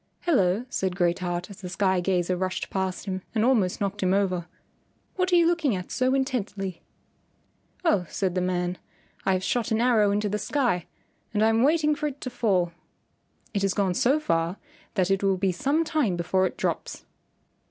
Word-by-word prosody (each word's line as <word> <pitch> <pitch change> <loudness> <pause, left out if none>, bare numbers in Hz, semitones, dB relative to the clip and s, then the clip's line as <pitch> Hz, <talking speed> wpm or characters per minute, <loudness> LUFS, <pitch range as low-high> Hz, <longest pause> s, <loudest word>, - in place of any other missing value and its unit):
"Hello," 220 - +2
said 190 -7 -2
Great 175 -1 +1
Heart 175 +1 -3
as 200 +1 -12
the 180 - -6
sky 190 0 +1
gazer 180 0 +1
rushed 185 +1 -3
past 190 -1 -2
him 190 -2 -3
and 220 0 +3
almost 220 -8 +2
knocked 200 0 -2
him 185 0 +2
over, 185 -3 0 0.7
"what 370 0 0
are - - +5
you 340 -1 +5
looking 330 - +2
at 180 -1 -6
so 255 +1 +2
intently?" 205 -9 -2 1.0
"Oh," 195 - +2
said 190 -3 -1
the 185 - 0
man, 180 0 -1 0.5
"I 190 - +4
have 185 0 -1
shot 240 +1 0
an 220 - +1
arrow 230 -4 +4
into 205 +1 +1
the 210 +1 -1
sky 220 - 0 0.5
and 210 - +3
I 220 - +5
am 225 0 +2
waiting 300 +2 +3
for 300 0 -2
it 285 -1 -6
to 255 - -4
fall. 190 -8 +1 0.8
It 200 - 0
has 195 -1 +1
gone 195 -3 +1
so 265 +11 +3
far 165 - 0 0.4
that 190 -2 +2
it 195 - +2
will 195 -1 +2
be 190 0 +1
some 280 - +1
time 305 - 0
before 185 +2 +1
it - - -9
drops." - - -3
195 Hz, 195 wpm, -26 LUFS, 185-245 Hz, 1.0 s, are